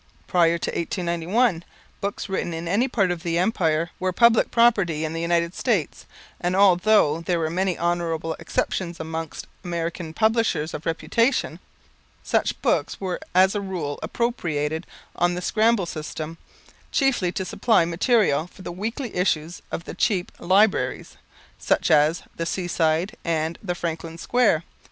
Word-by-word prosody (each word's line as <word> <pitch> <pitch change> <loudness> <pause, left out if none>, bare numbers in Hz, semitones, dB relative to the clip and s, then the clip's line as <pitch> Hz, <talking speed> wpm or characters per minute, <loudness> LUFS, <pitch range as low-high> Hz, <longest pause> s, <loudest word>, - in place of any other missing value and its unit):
Prior 170 -1 +3
to - - -3
1891, 175 +3 0 0.4
books 200 0 -3
written 180 -3 -2
in 165 +1 -5
any 210 +9 +2
part 200 -8 +1
of 175 -2 -3
the 170 -1 -1
Empire 170 -4 +1
were 185 0 0
public 235 +4 +4
property 195 -10 +3
in 155 - -4
the 165 - -3
United 170 0 +1
States, 205 - -1 0.3
and, 180 +1 -1
although 190 -4 +4
there 175 +1 0
were 160 -1 -1
many 185 0 0
honorable 165 -2 -1
exceptions 170 -2 -2
amongst 160 -1 -5 0.2
American 170 -1 -3
publishers 220 -5 +1
of 155 - -6
reputation, 195 - 0 0.6
such - - 0
books - - +1
were 185 -2 -3 0.2
as 190 +1 +5
a 205 - -1
rule 175 -7 -4
appropriated 160 -9 -2 0.3
on 175 0 +1
the - - -3
scramble 215 +1 +2
system, 160 0 -6 0.5
chiefly 255 -11 +2
to 190 - -3
supply 220 -1 +2
material 175 - +2
for 185 - -15
the - - -5
weekly 225 +7 -4
issues 170 -2 0
of 170 - -4
the - - -7
cheap 185 -5 0
"Libraries," 185 -7 +2 0.4
such - - +1
as 150 +3 +4
"The 165 - -2
Seaside" 175 +2 0
and 160 0 -1
"The 180 -4 -3
Franklin 165 -1 -4
Square." 215 -5 +2
175 Hz, 145 wpm, -24 LUFS, 165-200 Hz, 0.6 s, as